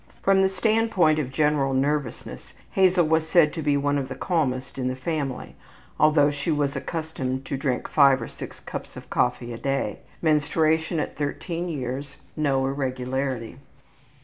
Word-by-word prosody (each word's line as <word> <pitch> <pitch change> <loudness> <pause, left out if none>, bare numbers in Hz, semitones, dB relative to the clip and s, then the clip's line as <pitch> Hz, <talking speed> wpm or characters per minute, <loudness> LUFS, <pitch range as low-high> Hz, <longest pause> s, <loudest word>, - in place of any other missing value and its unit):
From 195 0 +4
the 190 - +4
standpoint 195 -6 +2
of 135 -4 -3
general 140 -1 +1
nervousness 140 -2 -2 0.2
Hazel 185 -2 +4
was 160 0 +1
said 160 -4 +5
to 160 - -4
be 145 -1 +2
one 145 0 +1
of 130 -1 -4
the - - -5
calmest 135 -7 -1
in 125 - -1
the 130 - -1
family, 135 -1 -3 0.5
although 150 -1 +5
she 145 +3 -4
was 145 -2 +1
accustomed 140 -3 -3
to - - -3
drink 135 -2 -1
five 140 -3 +5
or 115 - -5
six - - -9
cups - - -7
of - - -11
coffee 120 0 0
a 115 - -7
day. 135 0 -1 0.2
Menstruation 160 +1 +2
at - - -3
13 165 +4 -3
years, 140 -1 -4 0.2
no 140 -3 +1
irregularity. 130 -2 -3
145 Hz, 160 wpm, -25 LUFS, 135-160 Hz, 0.5 s, said